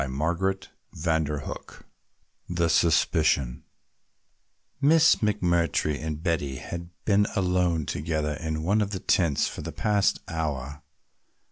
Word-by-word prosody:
CHAPTER 85 +8 0 0.4
XVII 80 -3 -3 0.7
THE 85 -1 +1
SUSPICION 80 -5 +2 1.2
Miss 160 +3 +5
McMurtry 85 -7 0
and 80 0 -4
Betty 80 -6 -1
had 85 +5 -7 0.2
been 100 -1 +3
alone 90 -5 +1
together 75 0 -2
in 80 +1 -4
one 100 +6 +2
of 100 - 0
the 100 -2 -4
tents 85 -6 +2
for - - -6
the - - -6
past 105 -2 +1
half - - -6
hour. 70 -3 -3
80 Hz, 115 wpm, -26 LUFS, 75-90 Hz, 1.2 s, Miss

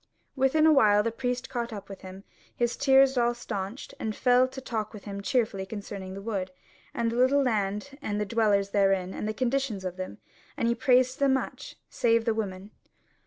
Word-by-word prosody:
Within 270 +4 +3
a 320 - +7
while 210 -7 +5
the 230 - -1
priest 250 +1 -3
caught 235 -1 -3
up 205 -2 -7
with 195 -1 -10
him, 190 +1 -10 0.3
his 240 -1 0
tears 270 -1 +4
all 240 0 +2
staunched, 210 0 -6
and 215 -1 -3
fell 250 0 +4
to 265 +1 -8
talk 220 -5 -4
with 205 - -10
him 200 -1 -6
cheerfully 215 -3 0
concerning 195 -1 -7
the 195 - -8
wood, 195 -4 -3 0.4
and 230 -1 -1
the - - -3
Little 270 +3 +4
Land 215 +4 -2
and 210 -6 -2
the 210 - 0
dwellers 205 -2 +1
therein 195 -2 +2
and 210 - -4
the - - 0
conditions 255 -6 -1
of 180 0 -4
them, 185 0 -6 0.4
and 230 - +1
he 235 - +3
praised 255 +1 +2
them 275 -1 +3
much, 265 - -5
save 230 -1 +1
the 230 - +2
women. 200 -2 -5
225 Hz, 200 wpm, -27 LUFS, 200-255 Hz, 0.4 s, a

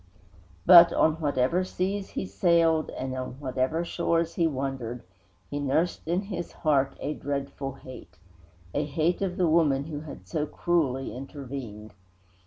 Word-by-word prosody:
But, 175 -1 +10
on 155 0 +3
whatever 145 +4 +1
seas 190 +2 -2
he - - -4
sailed, 160 - +2
and 130 0 -4
on 130 -1 -4
whatever 135 +4 -1
shores 165 -1 0
he 165 - +2
wandered, 130 -4 -4 0.5
he 145 - -2
nursed 155 +5 0
in 175 +3 +1
his 190 -4 -5
heart 140 -4 +1
a 150 - -2
dreadful 140 -1 -4
hate 130 -10 -12 0.6
a 145 - 0
hate 155 +5 0
of 185 -2 -2
the 180 - +3
woman 155 -4 +3
who 150 -1 -6
had 140 -12 -10
so 150 +8 -2
cruelly 135 -10 -1
intervened. 125 -6 -8
145 Hz, 145 wpm, -27 LUFS, 130-170 Hz, 0.6 s, But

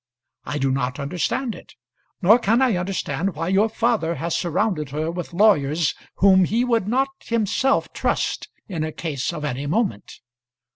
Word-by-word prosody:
I 150 - -3
do 135 -1 +1
not 130 -1 -2
understand 180 - -2
it; - - -14 0.5
nor 215 +7 +7
can 230 +1 +2
I 255 -6 +3
understand 180 -2 -2
why 165 +3 -2
your 200 +4 +3
father 220 -8 0
has 165 +3 -2
surrounded 170 -3 -1
her 155 +4 -2
with 175 -1 -6
lawyers 170 -6 +3 0.2
whom 190 -1 +5
he 230 +7 +1
would 230 -5 +1
not 265 +5 +1
himself 230 +4 0
trust - - -1 0.2
in 170 -7 -3
a 155 - -3
case 150 -5 -3
of 150 - -5
any 140 0 -3
moment. 205 +6 -2
180 Hz, 160 wpm, -22 LUFS, 150-220 Hz, 0.5 s, nor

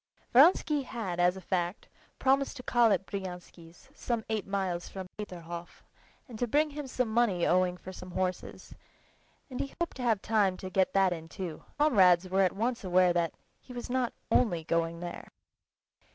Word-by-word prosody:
Vronsky 295 +2 +5
had 215 -9 -5
as 180 +1 +3
a - - -8
fact 180 +2 -2 0.3
promised 275 +1 +1
to 250 - -8
call 240 -3 +4
at 190 -1 +1
Bryansky's, 180 0 -8
some 235 -6 -3
eight 215 -3 -2
miles 190 -3 -2
from 190 -1 -7
Peterhof, 175 -4 -8 0.4
and 230 -4 -10
to 245 - 0
bring 300 +5 +2
him 290 -1 -6
some 250 -1 -1
money 220 -6 +2
owing 180 0 +2
for 185 - -9
some 185 0 -9
horses; 185 0 -4 0.8
and 250 - -5
he 275 - -4
hoped 340 -4 -2
to - - -6
have 230 -4 +2
time 205 -4 +2
to 185 0 -7
get 190 -1 +2
that 195 -2 +3
in 165 -1 -8
too. 170 -3 -7
But 295 - +3
his - - +5
comrades 185 -4 +5
were 190 +1 +2
at 185 -2 +2
once 235 +3 -1
aware 180 -1 +4
that 170 -2 0 0.2
he 250 - -13
was 245 0 -6
not 255 -2 0 0.2
only 175 -10 +2
going 165 +1 -1
there. 175 -1 -7
190 Hz, 185 wpm, -30 LUFS, 180-240 Hz, 0.8 s, Vronsky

